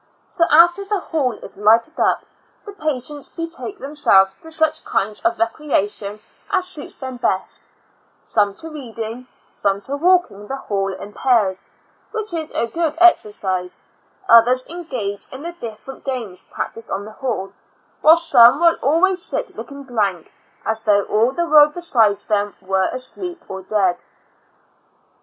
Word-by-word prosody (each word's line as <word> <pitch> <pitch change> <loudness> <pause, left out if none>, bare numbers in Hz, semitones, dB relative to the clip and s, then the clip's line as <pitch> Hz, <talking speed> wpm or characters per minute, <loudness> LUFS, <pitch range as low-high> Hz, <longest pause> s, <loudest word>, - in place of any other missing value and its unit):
So 340 -4 +2
after 345 +5 +6
the 400 0 -1
hall 290 -8 -1
is - - -7
lighted 225 +9 +3
up, - - +2 0.4
the 410 - -9
patients 295 -4 -4
betake 335 +4 -5
them 280 -3 -8
selves 195 -9 +4
to 320 - -10
such 315 -1 0
kinds 210 +1 -2
of 345 +1 +1
recreation 215 -5 -1 0.3
as 375 -2 +1
suits 340 -6 -7
them 260 -1 -7
best 190 -5 -2 0.3
— - - -36
some 205 -2 +1
to 325 - -6
reading, 240 -3 -6 0.2
some 200 0 -1
to 275 +7 -4
walk 360 +4 +3
ing 205 +1 -12
the 270 - -3
hall 195 -7 -2
in 200 +2 -9
pairs, 210 -8 +1 0.5
which 435 -4 -3
is 320 -2 -3
a - - +1
good 320 +5 -2
exer 350 -11 +5
cise, 185 -3 -3 0.5
others 245 +3 +6
engage 255 - -5
in 260 +3 -8
the 340 - -4
different 250 -4 -9
games 235 -9 -4
practiced 230 - -6
on 200 +1 -3
the 215 - -9
hall, 215 -6 -4 0.5
while 315 +1 +8
some 260 -6 +6
will 335 -1 +4
always 360 +6 +2
sit - - -4
looking 280 0 -8
blank, 205 -9 -2 0.3
as 220 0 0
though 205 -2 +3
all 220 +5 +2
the 345 +5 -1
world 300 -2 +6
besides 230 - +2
them 205 -2 -1
were 190 0 0
asleep 345 +7 -6
or 190 0 -6
dead. 190 -2 0
255 Hz, 160 wpm, -20 LUFS, 205-325 Hz, 0.5 s, while